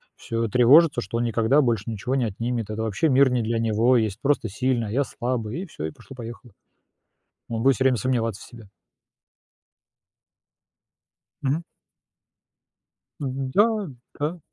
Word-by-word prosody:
всё 115 0 -3
тревожится, 135 - +5
что 100 +4 -4
он 120 - 0
никогда 115 +5 +3
больше 115 -6 0
ничего 115 +4 -2
не 130 -3 +1
отнимет. 115 +1 -3
Это 110 +1 -3
вообще 110 +9 0
мир 135 0 +5
не 125 -1 +1
для 115 +1 -1
него, 115 +3 +3
есть 110 -3 -1
просто 140 -5 +1
сильный, 120 +1 -1
а - - -6
я 140 +5 +2
слабый, 120 +1 -3
и - - -7
всё, 155 - -7
и 80 - -4
пошло-поехало. 120 - -11 1.0
Он 115 -1 -3
будет 135 0 +4
всё 130 - 0
время 130 -2 +4
сомневаться 115 -5 -1
в - - -10
себе. 115 -5 -14 2.7
Мгм. 145 +5 -1 1.6
М-да, 135 +7 +1 0.5
да. 155 +4 -2
120 Hz, 145 wpm, -24 LUFS, 115-135 Hz, 2.7 s, тревожится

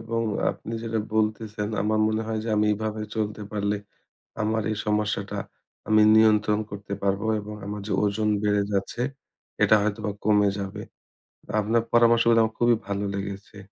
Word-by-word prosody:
এবং 115 0 -2 0.3
আপনি 115 - -8
যেটা 115 -1 -2 0.2
বলতেছেন 110 -1 -1
আমার 110 +1 +1
মনে 110 0 0
হয় 110 -1 -2
যে 115 - -4
আমি 105 - +3
এভাবে 110 +1 -3
চলতে 105 -1 -2
পারলে 105 0 0 0.7
আমার 110 +1 0
এই 110 - -2
সমস্যাটা 105 -1 -1 0.5
আমি 110 0 +5
নিয়ন্ত্রণ 105 -1 +4
করতে 100 0 -6
পারবো 100 +2 0
এবং 105 +1 -7
আমার 105 0 -5
যে - - -4
ওজন 105 +1 +1
বেড়ে 105 0 +2
যাচ্ছে 100 +4 -2 0.6
এটা - - +6
হয়তোবা 105 0 -1
কমে 105 -1 +4
যাবে। 100 -1 -5 0.8
আপনার 110 +2 +1
পরামর্শগুলো 115 0 +5
আমার 110 0 -3
খুবই 120 -1 +4
ভালো 100 0 -2
লেগেছে। 100 +1 -6
105 Hz, 155 wpm, -25 LUFS, 105-110 Hz, 0.8 s, এটা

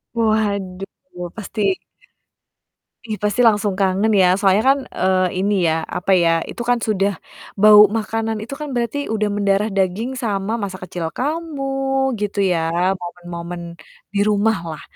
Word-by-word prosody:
Waduh, 200 -3 -2
pasti 220 0 -5 1.4
Ih, 215 -2 -4
pasti 210 +3 +1
langsung 205 -2 +2
kangen 195 +2 +2
ya, 180 - +5
soalnya 195 +1 +4
kan, 275 +1 +4 0.2
eee, 185 -1 +2
ini 205 +2 +1 0.2
ya, - - +2 0.2
apa 180 - -1
ya, 165 - +3 0.2
itu - - -6
kan 245 -1 +3
sudah 200 -2 +1 0.5
bau 210 0 +9 0.2
makanan 225 0 -2
itu 240 +5 -8
kan 300 - -5
berarti 240 +3 -1 0.2
udah 210 -1 0
mendarah 200 +1 +1
daging 195 +5 0
sama 200 -2 -1
masa 190 -2 -4
kecil 180 -2 -5
kamu 305 +1 -3 0.6
gitu 205 0 -2
ya, 175 - +2 0.4
momen-momen 175 0 -7 0.5
di 200 - 0
rumah 210 +1 +2
lah. 155 - -8
205 Hz, 140 wpm, -20 LUFS, 185-220 Hz, 1.4 s, bau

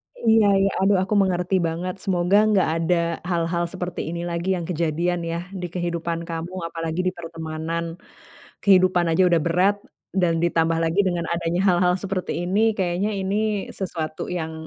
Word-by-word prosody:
Iya 225 -2 +4
iya. 195 - +3
Aduh, 195 0 +4
aku 190 - -2
mengerti 185 0 0
banget. 175 +3 -3
Semoga, 185 0 +2
nggak 195 -6 +3
ada 165 +2 +2 0.3
hal-hal 170 0 0
seperti 180 -1 -4
ini 170 0 -4
lagi, 170 +1 -3
yang 170 -2 -4
kejadian, 170 +1 0
ya? 170 - -2 0.2
Di 180 - -3
kehidupan 170 -1 -2
kamu, 165 +2 -4 0.2
apalagi 165 +1 -3
di - - +2
pertemanan. 165 0 -4 0.8
Kehidupan 185 -2 +4
aja 175 +3 +4
udah 170 -2 +3
berat, 185 +4 +3 0.4
dan 180 -3 +2
ditambah 165 -1 +2
lagi 165 +4 0
dengan 175 -2 -1
adanya 170 +1 -1
hal-hal 180 0 +3
seperti 190 -1 -3
ini, 195 +4 +1 0.2
kayaknya 185 +2 0
ini 195 +1 -1 0.4
sesuatu 160 -5 -4
yang 160 -3 -3
175 Hz, 155 wpm, -23 LUFS, 165-185 Hz, 0.8 s, Iya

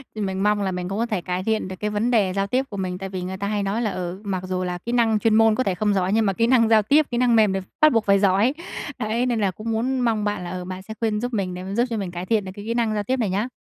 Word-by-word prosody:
Mình 195 -2 -2
mong 210 0 +2
là 195 -1 -1
mình 180 0 -4
cũng 195 - -3
có 230 - +1
thể 210 -6 -2
cải 180 +1 -3
thiện 220 -1 0
được 185 - -6
cái 210 - -1
vấn 210 +4 0
đề 205 -6 +2
giao 195 0 0
tiếp 255 +5 0
của 200 - -7
mình, 185 -1 -3
tại 195 +1 -6
vì 185 -1 -5
người 185 +1 -5
ta 200 +1 -3
hay 205 -1 -1
nói 200 +4 -1
là, 215 -4 0
ừ, 180 +1 -5
mặc 190 -3 -3
dù 185 0 -2
là 180 -1 -3
kỹ 230 +7 -6
năng 230 -3 +2
chuyên 220 +1 +2
môn 225 -1 +5
có 255 - +1
thể 195 -5 -1
không 210 +3 +1
giỏi, 190 0 +1
nhưng 220 0 +3
mà 195 - +1
kỹ 230 +4 +1
năng 235 -3 +4
giao 220 -1 +6
tiếp, 290 +9 +3
kỹ 240 - -1
năng 245 -1 +3
mềm 215 -3 +4
đ - - 0 0.2
bắt 310 0 +7
buộc 225 -2 +2
phải 200 0 +4
giỏi. 200 +6 +3 0.5
Đấy, 230 +2 0
nên 240 -3 0
là 200 -3 +1
cũng 215 +5 -5
muốn 250 +4 0
mong 230 -4 +1
bạn 205 -3 -2
là, 175 - -5
ờ, 180 0 -5
bạn 185 0 -6
sẽ 220 +3 -8
khuyên 215 -2 0
giúp 245 +1 -3
mình 190 -4 -1
để 180 +1 -6
mà 190 +1 -5
giúp 235 - +3
cho 230 - -2
mình 195 -4 -4
cải 175 +1 -5
thiện 215 -1 +1
được 185 - -6
cái 205 - -9
kỹ 230 - -1
năng 230 -2 0
giao 210 -1 -1
tiếp 260 +6 -1
này 220 -5 0
nhá. 200 +5 -1
210 Hz, 350 wpm, -23 LUFS, 190-225 Hz, 0.5 s, bắt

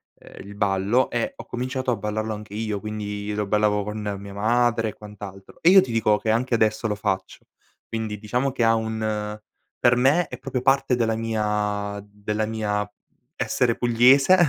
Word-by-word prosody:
ehm, - - -13
il 100 - -10
ballo 100 +5 +1
e 275 0 -1
ho - - -10
cominciato 130 +1 -2
a - - +1
ballarlo 110 +1 -3
anche 105 -1 -8
io, 110 -2 -2
quindi 105 -1 -4
lo 105 0 -1
ballavo 105 0 +2
con 105 +1 -5 0.2
mia 100 0 -9
madre 115 +2 +2
e - - -8
quant'altro, 100 -2 -11
e 165 - +6
io 190 +1 +9
ti 130 - -4
dico 110 -2 +3
che 110 +1 -1
anche 120 +2 +1
adesso 110 0 +1
lo 105 - -1
faccio; 95 -2 -3 0.4
quindi 110 -2 -3
diciamo 125 +6 -1
che 125 -2 -1
ha 115 0 +5
un 110 -1 -2 0.4
per 120 -1 +4
me 140 +7 +3
è - - -8
proprio 130 -2 -3
parte 135 -1 +3
della 115 -2 +1
mia 105 -2 -1
della 105 +1 -3
mia 105 -2 -2 0.4
essere 120 -2 +1
pugliese, 125 +7 +5
110 Hz, 180 wpm, -24 LUFS, 105-120 Hz, 0.4 s, io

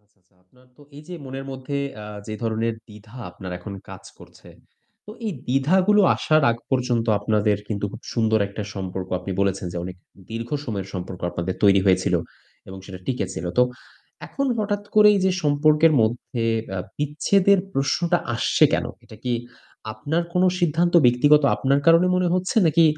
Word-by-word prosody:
আচ্ছা, 105 -1 -40
আচ্ছা। 90 +1 -39
আপনার 125 +7 -26
তো 145 - -17
এই 150 - -10
যে 180 - -6
মনের 135 +1 -7
মধ্যে 135 +1 -5 0.3
আ - - -8 0.2
যে 110 - -5
ধরনের 115 0 -1
দ্বিধা 105 +2 -14
আপনার 90 0 -8
এখন 100 +3 -8 0.2
কাজ - - -11
করছে, - - -16 0.6
তো 210 - -9 0.2
এই 205 - -1
দ্বিধাগুলো 185 +11 +3 0.2
আসার 155 0 +2
আগ 115 - -1
পর্যন্ত 125 -3 0
আপনাদের 105 0 +1
কিন্তু 105 -2 -3
খুব - - -10
সুন্দর 110 -2 +2
একটা 100 +1 -6
সম্পর্ক, 95 -1 -5
আপনি 90 +2 -7
বলেছেন, 95 -1 0
যে - - -6
অনেক 90 0 -7 0.3
দীর্ঘ 115 +1 -5 0.2
সময়ের 100 -6 -4
সম্পর্ক 90 0 -6
আপনাদের 85 +2 -3
তৈরি 100 -1 +6
হয়েছিল 95 - +3 0.5
এবং 95 0 -8
সেটা 95 -1 -9
টিকে 125 -7 -1
ছিল। 80 - -5
তো - - +8 0.6
এখন 275 0 -2
হঠাৎ 205 -1 -1
করে 210 0 +7
এই 195 - +1
যে 190 - +3
সম্পর্কের 155 +2 +4
মধ্যে 115 +1 -1 0.3
অ্যা 95 -1 -3 0.2
বিচ্ছেদের 185 +7 +2
প্রশ্নটা 170 +5 +1 0.2
আসছে 115 - +3
কেনো? - - 0
এটা 110 - -13
কি 125 - 0 0.6
আপনার 145 +11 -2
কোনো 180 +1 +4
সিদ্ধান্ত 175 +1 +1
ব্যক্তিগত 145 +5 +5
আপনার 140 +1 +1
কারণে 165 +2 +6
মনে 180 -1 +1
হচ্ছে 185 +3 -2
নাকি 165 +1 +4
125 Hz, 170 wpm, -23 LUFS, 105-160 Hz, 0.6 s, তো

